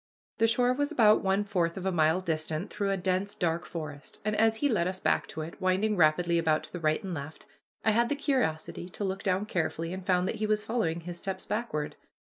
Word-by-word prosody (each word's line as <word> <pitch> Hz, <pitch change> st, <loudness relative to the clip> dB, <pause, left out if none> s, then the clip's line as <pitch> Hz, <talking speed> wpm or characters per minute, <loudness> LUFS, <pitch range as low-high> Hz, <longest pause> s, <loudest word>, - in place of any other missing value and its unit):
The 225 Hz, -, +5 dB
shore 245 Hz, +2 st, +3 dB
was 285 Hz, +2 st, -1 dB
about 215 Hz, -3 st, +5 dB
one 195 Hz, +1 st, +2 dB
fourth 180 Hz, -5 st, 0 dB
of 190 Hz, -, -5 dB
a 190 Hz, -, +2 dB
mile 160 Hz, +1 st, +3 dB
distant 160 Hz, +1 st, -2 dB
through 200 Hz, -1 st, -1 dB
a 195 Hz, -, +1 dB
dense, 190 Hz, +2 st, -1 dB
dark 170 Hz, -1 st, -1 dB
forest, 150 Hz, -4 st, -7 dB
and 215 Hz, 0 st, +1 dB
as 225 Hz, +1 st, +4 dB
he 290 Hz, +6 st, +1 dB
led 200 Hz, -10 st, +1 dB
us 185 Hz, 0 st, -3 dB
back -, -, +1 dB
to 160 Hz, -, -6 dB
it, 160 Hz, +5 st, -8 dB
winding 190 Hz, +3 st, +2 dB
rapidly 170 Hz, 0 st, +3 dB
about 155 Hz, -2 st, +2 dB
to -, -, -12 dB
the 175 Hz, -, -4 dB
right 155 Hz, -1 st, +1 dB
and 190 Hz, -2 st, -4 dB
left, 145 Hz, 0 st, -7 dB, 0.4 s
I 220 Hz, -, +5 dB
had 235 Hz, +2 st, +2 dB
the 290 Hz, -, +1 dB
curiosity 205 Hz, -, -1 dB
to 205 Hz, -, -6 dB
look 195 Hz, 0 st, -2 dB
down 190 Hz, +1 st, 0 dB
carefully 165 Hz, -3 st, -2 dB
and 190 Hz, 0 st, -6 dB
found 180 Hz, 0 st, +2 dB
that -, -, -2 dB
he 215 Hz, -, -1 dB
was 210 Hz, 0 st, +1 dB
following 175 Hz, -8 st, -1 dB
his 175 Hz, +1 st, -7 dB
steps 195 Hz, -1 st, -4 dB
backward. 210 Hz, -9 st, -3 dB
185 Hz, 235 wpm, -29 LUFS, 165-210 Hz, 0.4 s, The